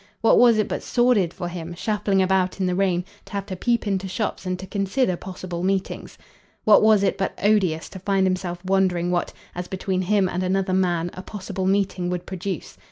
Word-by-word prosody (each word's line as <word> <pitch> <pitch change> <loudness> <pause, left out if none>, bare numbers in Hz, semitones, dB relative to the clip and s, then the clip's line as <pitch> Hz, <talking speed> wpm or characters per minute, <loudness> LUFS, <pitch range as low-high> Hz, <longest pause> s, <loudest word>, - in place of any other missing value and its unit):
What 225 - +5
was 235 -2 +6
it 215 - +1
but - - -3
sordid 240 -8 +2
for 175 - -5
him, 175 -1 -6
shuffling 205 0 +1
about 185 0 +1
in 190 - +1
the 180 - +1
rain, 180 -2 +1 0.2
to - - -15
have 200 -1 -2
to 190 - -5
peep 235 +5 0
into 195 -2 -1
shops 190 0 -3
and 185 0 -1
to 190 - -8
consider 195 +2 0
possible 180 -1 -6
meetings? 190 +1 -2 0.5
What 215 - +6
was 215 -2 +5
it 195 - +1
but 195 - -2
odious 190 -6 +2
to 190 - -9
find 195 0 +1
himself 185 -1 -2
wondering 185 -2 +1
what, 175 -1 0 0.2
as 180 0 -5
between 190 0 -2
him 195 +1 +2
and 180 0 -2
another 185 0 0
man, 175 -2 +1
a 185 - -7
possible 190 -1 -4
meeting 195 -2 +1
would 180 0 -3
produce? 185 -3 -5
190 Hz, 205 wpm, -23 LUFS, 180-200 Hz, 0.5 s, was